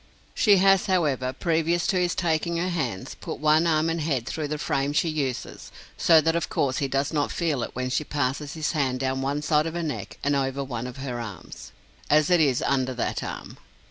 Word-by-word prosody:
She 205 -4 +5
has, 195 +1 +4
however, 145 -9 +1
previous 165 +3 0
to - - +1
his 180 -1 0
taking 170 0 0
her 180 +2 0
hands, 160 - -3
put - - -7
one 155 +2 +3
arm 155 -1 +2
and 165 0 -1
head 140 -6 -1
through 155 +3 -3
the 150 +1 -3
frame 140 -1 -1
she 165 +2 +2
uses; 140 -5 -4 0.2
so 165 -2 +5
that 165 +2 +1
of 170 - -1
course 130 -2 0
he 140 - 0
does 135 +3 -1
not 145 -2 0
feel 160 -7 -1
it - - -5
when 125 0 -2
she 155 - 0
passes 145 0 -2
his 155 -1 -1
hand 135 -5 0
down 135 0 -1
one 140 +2 -2
side 155 0 +2
of 165 - -5
her 170 - -2
neck 130 -11 -5
and 145 0 +2
over 135 0 -1
one 125 -2 -5
of 125 - -9
her 130 -3 -4
arms, 100 -7 -9 0.4
as 150 +2 +4
it 175 - +5
is 135 -5 +2
under 130 -2 0
that 120 - -2
arm. - - -7
150 Hz, 220 wpm, -25 LUFS, 135-165 Hz, 0.4 s, She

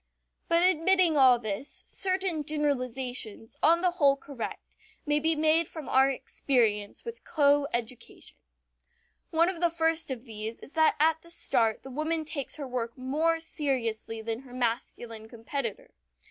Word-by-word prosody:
But 335 +1 +3
admitting 365 -1 +4
all 260 -3 +7
this 220 +4 -4
certain 370 -4 0
generalizations, 255 -6 -2
on 335 +2 +4
the 360 -1 +3
whole 285 -5 +3
correct, 275 -3 -7 0.3
may 295 0 +2
be 320 +2 +2
made 315 +1 +3
from 315 -3 -8
our 265 +1 +4
experience 230 - -1
with 465 0 -7
coeducation. 280 -5 0 1.0
One 330 +1 +3
of 365 -2 -2
the 345 0 +3
first 325 -1 0
of 255 -2 -5
these 220 0 -6
is - - -13
that 315 -1 +4
at 320 +1 +3
the 335 - -13
start 225 -9 +1
the 265 - -9
woman 310 +3 -1
takes 285 -3 -4
her 285 -3 -5
work 240 -1 -4
more 310 +6 +1
seriously 230 -8 -3
than 225 0 -3
her 250 -1 -13
masculine 230 -2 -3
competitor. 280 - -5
280 Hz, 145 wpm, -28 LUFS, 240-325 Hz, 1.0 s, all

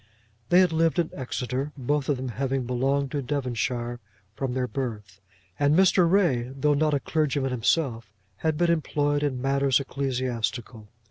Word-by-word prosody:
They 180 +1 +6
had 180 -2 +3
lived 165 +1 +2
in 170 -2 0
Exeter, 130 +2 -3
both 140 +2 -1
of 145 - +2
them 130 0 -4
having 135 +1 -2
belonged 135 +3 0
to 145 - -1
Devonshire 120 -3 -2 0.3
from 130 +1 -3
their 130 -1 0
birth; 105 -8 -5 0.4
and 145 +1 +3
Mr. 185 -1 +5
Ray, 145 -11 +2
though 145 +2 +2
not 150 +1 +2
a - - +1
clergyman 140 -2 0
himself, 120 -2 0 0.3
had 160 -1 -1
been 175 0 +3
employed 145 -3 0
in 140 -4 -1
matters 135 0 +2
ecclesiastical. 125 -5 -3
135 Hz, 155 wpm, -26 LUFS, 125-150 Hz, 0.4 s, They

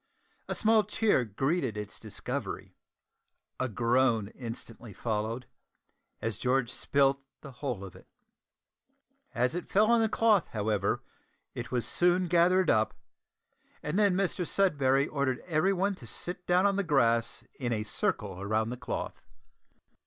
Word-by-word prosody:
A - - -2
small 220 -1 +4
cheer 210 - +2
greeted 120 - -1
its 105 -1 -7
discovery. - - -5 0.8
A 130 - 0
groan 115 -1 +2
instantly 115 -2 -8
followed, 115 +3 -2 0.8
as 110 -3 -2
George 125 -1 +1
spilt 135 +2 +2 0.2
the 140 - -10
whole 125 -5 -4
of 95 - -9
it. - - -16 1.3
As 125 +3 +1
it 175 - -5
fell 215 +3 +4
on 235 -1 +5
the 220 - +2
cloth, 220 -4 +3
however, 105 -2 0 0.5
it - - -6
was 125 -1 0
soon 180 +1 +2
gathered 175 +1 +4
up, 110 -1 +2 0.9
and 150 +7 -1
then 200 -3 +4
Mr 190 -1 0
Sudberry 140 -7 +2
ordered 140 -3 -1
everyone 185 +4 +1
to 125 -11 -11
sit 180 +9 -5
down 180 +2 +4
on 200 -1 +3
the 200 - +1
grass 120 -7 +2 0.2
in 120 -3 -2
a 110 -2 0
circle 100 -2 -2
round 110 +3 0
the 125 - -5
cloth. 125 - -5
135 Hz, 140 wpm, -30 LUFS, 115-180 Hz, 1.3 s, on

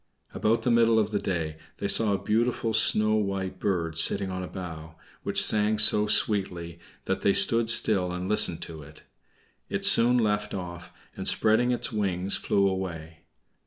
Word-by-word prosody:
About 115 +1 -1
the 125 - 0
middle 115 -1 +3
of 110 -1 0
the 105 - -1
day 80 -4 -4 0.2
they 100 - -4
saw 110 +1 +4
a 100 0 -4
beautiful 115 +1 -1
snow 110 -1 +2
white 100 -3 -3
bird 85 -6 -2
sitting 95 +3 +2
on 95 0 -5
a 90 - -6
bough, 80 -4 -9 0.3
which - - +2
sang 105 0 +2
so 105 0 +4
sweetly 90 -6 -1 0.3
that - - -3
they 100 - +2
stood 115 +2 +1
still 100 -6 +4
and 90 +1 -5
listened 105 -5 0
to 80 -2 -10
it. 75 +2 -16 0.7
It - - -3
soon 120 +2 +3
left 105 -3 -1
off 90 -2 -8 0.2
and, - - -3
spreading 110 +3 +2
its 125 0 -1
wings, 95 -2 -1
flew 100 -1 0
away. 85 -4 -6
100 Hz, 170 wpm, -25 LUFS, 90-110 Hz, 0.7 s, saw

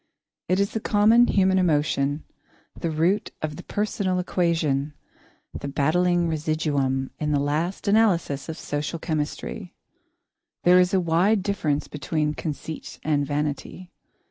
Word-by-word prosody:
It 185 +1 +2
is 200 0 +1
the 220 - -2
common 220 +3 +4
human 190 -1 +3
emotion, 145 -3 +1 0.5
the 165 - -3
root 165 +6 +1
of 150 -1 -2
the - - -8
personal 200 -3 -1
equation, 160 -6 0 0.6
the - - -5
battling 175 +5 +2
residuum 150 -4 -1
in 150 -1 -1
the 145 - +2
last 155 +9 -2
analysis 190 -10 +2
of 160 - -5
social 150 +1 -3
chemistry. 160 +4 -4 0.9
There 180 +1 +6
is 180 +2 +3
a - - +4
wide 180 +4 +2
difference 165 -8 -1
between 150 +1 -2
conceit 155 0 -6
and 145 -2 +1
vanity. 150 +5 -3
160 Hz, 130 wpm, -24 LUFS, 150-185 Hz, 0.9 s, There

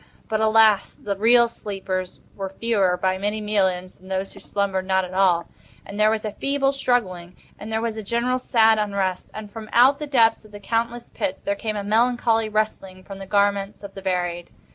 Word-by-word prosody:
But 215 0 -1
alas! 220 -2 +4
the 200 -1 -4
real 235 +4 +5
sleepers 190 -4 -5
were 195 -1 -4
fewer, 195 -3 +1
by 185 0 0
many 210 +2 -1
millions, 190 -4 -1
than 185 - -17
those 190 0 -3
who - - -13
slumbered 195 -2 -2
not 190 -1 +2
at 180 - -10
all; 180 -3 +2 0.4
and 200 +1 -8
there 215 0 +5
was 220 0 -1
a 215 - -2
feeble 275 +4 0
struggling; 190 -10 -1 0.2
and 215 +2 -8
there 220 0 0
was 225 -1 -2
a - - -3
general 235 +4 -1
sad 225 -3 +3
unrest; 200 -3 -2
and 210 -1 -8
from 220 -1 -9
out 260 +4 +5
the 300 - -5
depths 230 -6 +3
of 215 - -17
the 205 - -10
countless 235 +3 -2
pits 185 - -4
there 200 - 0
came 215 +1 -4
a 205 - -3
melancholy 225 +1 +2
rustling 200 -3 -2
from 195 +1 -10
the 195 - -8
garments 200 0 0
of 200 -1 -9
the 195 - -9
buried. 175 -2 -2
205 Hz, 205 wpm, -23 LUFS, 190-225 Hz, 0.4 s, real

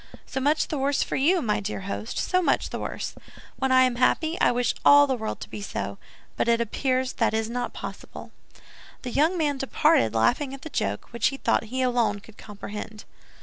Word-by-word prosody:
"So 270 - -4
much 290 +4 +1
the 300 - -2
worse 275 +1 +1
for - - -4
you, 330 +5 +3
my 210 -2 +1
dear 200 -1 -4
host, 200 +3 -5
so 365 0 +1
much - - +1
the - - -4
worse! - - -4 0.4
When 265 -1 0
I 255 0 +6
am 250 -2 +1
happy, 315 +6 +2
I - - +5
wish 245 -1 +1
all 285 0 +8
the 270 - 0
world 220 -3 -4
to - - -6
be 210 - -8
so; 200 - -5 0.4
but - - 0
it 235 0 +3
appears 255 +3 0
that 225 -2 +1
is 220 +1 -1
not 245 0 -3
possible." - - -9 0.7
The 250 - -4
young 315 +8 +2
man 290 -4 0
departed, 270 - +2
laughing 260 - +1
at 270 - -14
the 315 - -8
joke, - - -2
which 235 - +2
he 275 - -2
thought 230 - +1
he 255 +4 -2
alone 235 -5 +1
could 210 +1 -17
comprehend. 210 +1 -8
255 Hz, 210 wpm, -25 LUFS, 220-280 Hz, 0.7 s, all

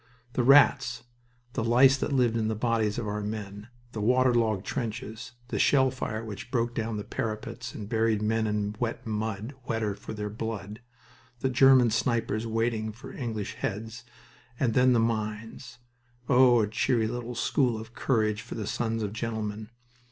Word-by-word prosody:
The - - +1
rats, 135 -1 +5 0.5
the 115 - -1
lice 125 +3 +6
that - - -2
lived 125 -4 +2
on 110 -1 0
the 110 - -1
bodies 110 -2 0
of 120 -3 -3
our 105 +1 -2
men, 105 0 -6 0.2
the 110 - -5
water 125 +3 +3
logged 110 -4 +1
trenches, 110 +1 -5 0.2
the - - -2
shell 130 -2 +4
fire 115 -3 -4
which 110 +3 -7
broke 120 -1 0
down 115 -1 -2
the 105 - -4
parapets 115 +4 -5
and 105 - -6
buried 110 0 +1
men 110 +1 0
in 105 0 -1
wet 115 -2 -3
mud, 110 +2 -3
wetter 110 -2 -1
for 105 - -8
their 105 0 -4
blood, 110 -1 -5 0.6
the 130 - +1
German 130 -2 +6
snipers 115 -1 0
waiting 115 -1 -1
for 130 +5 -11
English 110 -5 -4
heads, 115 +2 -4 0.6
and 120 -4 +1
then 125 +1 +5
the 120 - +3
mines 115 +2 -3 0.5
oh, 125 -3 +6
a - - 0
cheery 110 +2 +1
little 120 +1 -4
school 120 -1 +1
of 110 +1 -10
courage 110 -5 0
for 115 - -8
the 110 -3 -4
sons 115 +1 -2
of 105 0 -3
gentlemen! 110 -1 -4
115 Hz, 170 wpm, -28 LUFS, 110-120 Hz, 0.6 s, lice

